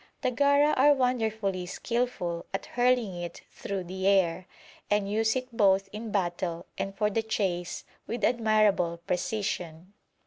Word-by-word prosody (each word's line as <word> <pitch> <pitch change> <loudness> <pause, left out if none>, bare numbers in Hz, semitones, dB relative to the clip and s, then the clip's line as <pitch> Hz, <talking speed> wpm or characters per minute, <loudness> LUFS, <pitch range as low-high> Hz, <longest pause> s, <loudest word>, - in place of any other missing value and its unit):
The 255 - +2
Gara 285 +3 +4
are 290 +2 +5
wonderfully 220 -8 0
skilful 200 -5 -2
at - - -4
hurling 245 -7 +1
it 170 -1 -7
through 195 -2 -4
the 190 +2 -3
air, 185 -2 +2 0.4
and 205 -1 +2
use 220 +3 +1
it 255 -2 -4
both 195 -2 +3
in 215 +1 -6
battle 175 -3 -2
and 195 0 -4
for 210 +1 +1
the 225 - +1
chase 190 -5 -2 0.2
with 235 - -4
admirable 215 -7 +2
precision. 180 -2 -3
205 Hz, 140 wpm, -28 LUFS, 180-235 Hz, 0.4 s, are